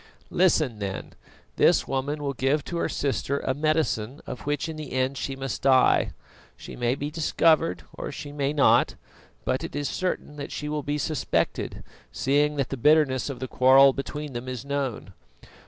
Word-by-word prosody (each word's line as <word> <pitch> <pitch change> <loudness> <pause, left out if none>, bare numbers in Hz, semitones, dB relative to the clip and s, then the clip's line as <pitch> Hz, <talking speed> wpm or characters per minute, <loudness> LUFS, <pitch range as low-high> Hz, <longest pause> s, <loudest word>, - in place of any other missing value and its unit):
"Listen 155 - +2
then: 100 -2 -5 0.4
this - - +4
woman 145 +3 -2
will 140 -1 -1
give 135 +3 0
to 170 - -4
her - - 0
sister 140 0 -1
a 130 - 0
medicine 145 -5 0
of 125 - -8
which 145 0 -1
in 160 - -5
the 155 -4 -7
end 130 +1 0
she 135 0 -4
must 135 0 -4
die. 130 -1 +4 0.5
She - - -9
may 120 +1 0
be 145 +2 -4
discovered 155 - +2
or - - -6
she 145 - -7
may 145 -1 -1
not, 145 -2 +4 0.5
but - - 0
it - - -6
is 145 -1 -1
certain 180 -2 -3
that 140 - -6
she 150 - -4
will 150 0 -2
be 145 +1 -2
suspected, 150 +1 -1 0.3
seeing 145 +2 +1
that 140 -3 -1
the 135 - -4
bitterness 145 -1 +3
of 135 - -6
the 130 - -4
quarrel 135 +2 +6
between 145 +1 -5
them 120 +1 -5
is 125 -1 -5
known. 135 -8 -3
140 Hz, 180 wpm, -26 LUFS, 130-150 Hz, 0.5 s, quarrel